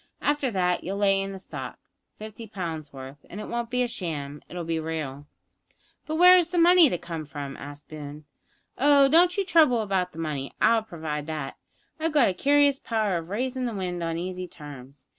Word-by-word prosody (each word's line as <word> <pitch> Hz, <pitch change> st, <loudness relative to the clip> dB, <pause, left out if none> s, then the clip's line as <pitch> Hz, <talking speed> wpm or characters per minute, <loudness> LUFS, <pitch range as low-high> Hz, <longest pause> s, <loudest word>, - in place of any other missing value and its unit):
After 290 Hz, -2 st, +1 dB
that 180 Hz, -4 st, 0 dB
you'll 195 Hz, +3 st, -3 dB
lay 195 Hz, -1 st, +3 dB
in 195 Hz, 0 st, -4 dB
the 195 Hz, -, -7 dB
stock 190 Hz, -, -8 dB, 0.4 s
fifty 220 Hz, +1 st, -9 dB
pounds' 165 Hz, -7 st, -5 dB
worth; 135 Hz, +1 st, -10 dB
and 200 Hz, -, -8 dB
it -, -, -6 dB
won't 235 Hz, -1 st, -3 dB
be 250 Hz, 0 st, +1 dB
sham; 155 Hz, -11 st, -4 dB
it'll 175 Hz, -1 st, -5 dB
be 165 Hz, 0 st, -2 dB
real 150 Hz, -3 st, -5 dB, 0.4 s
" -, -, -39 dB
"But 310 Hz, -, -2 dB
where 360 Hz, +2 st, +8 dB
is 345 Hz, -1 st, 0 dB
the 360 Hz, -, -3 dB
money 345 Hz, -2 st, +7 dB
to 175 Hz, -, -1 dB
come 170 Hz, -2 st, -6 dB
from?" 140 Hz, -2 st, -7 dB
asked 145 Hz, +1 st, -9 dB
Boone. 150 Hz, -1 st, -9 dB, 0.5 s
"Oh, 280 Hz, 0 st, +6 dB
don't 345 Hz, +5 st, +4 dB
you 395 Hz, -, +1 dB
trouble 310 Hz, -, +4 dB
about 190 Hz, -3 st, -1 dB
the -, -, -15 dB
money; 150 Hz, -4 st, -4 dB
I'll 230 Hz, -1 st, +4 dB
provide 155 Hz, -7 st, -5 dB
that. 155 Hz, -4 st, -4 dB, 0.4 s
I've 320 Hz, 0 st, -1 dB
a 245 Hz, -10 st, +4 dB
curious 285 Hz, +6 st, +3 dB
power 215 Hz, -4 st, -1 dB
of 165 Hz, 0 st, -7 dB
raisin' 255 Hz, +5 st, -2 dB
the 235 Hz, -3 st, -3 dB
wind 180 Hz, -2 st, -3 dB
on 165 Hz, -1 st, -2 dB
easy 180 Hz, +1 st, -4 dB
terms. 140 Hz, -4 st, -12 dB
185 Hz, 200 wpm, -26 LUFS, 155-250 Hz, 0.5 s, where